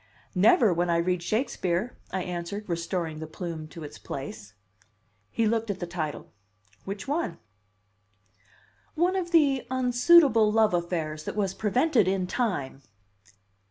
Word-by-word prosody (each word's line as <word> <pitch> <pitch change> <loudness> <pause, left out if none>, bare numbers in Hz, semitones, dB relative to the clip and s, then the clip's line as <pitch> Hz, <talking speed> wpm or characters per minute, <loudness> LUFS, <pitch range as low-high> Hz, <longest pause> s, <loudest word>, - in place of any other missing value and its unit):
"Never 205 +1 +5
when 175 +1 0
I 170 - +3
read 180 +1 0
Shakespeare," 210 0 -1 0.2
I 190 -1 -2
answered 180 +4 -5
restoring 170 -2 -3
the 160 - -6
plume 160 -1 -6
to 160 +1 -10
its 145 - -9
place. 110 -6 -7 0.7
He 225 - 0
looked 225 0 0
at 195 -2 -3
the 175 - -3
title. 165 -4 -5 0.5
"Which 200 +4 -6
one?" 290 - -1 1.6
"One 350 +4 +2
of 365 -2 -2
the 290 -6 +3
unsuitable 250 -2 +5
love 220 -2 +3
affairs 165 -3 -2
that - - -4
was 195 -3 0
prevented 220 - +2
in 190 -1 +1
time." 180 - -2
190 Hz, 135 wpm, -27 LUFS, 170-230 Hz, 1.6 s, Never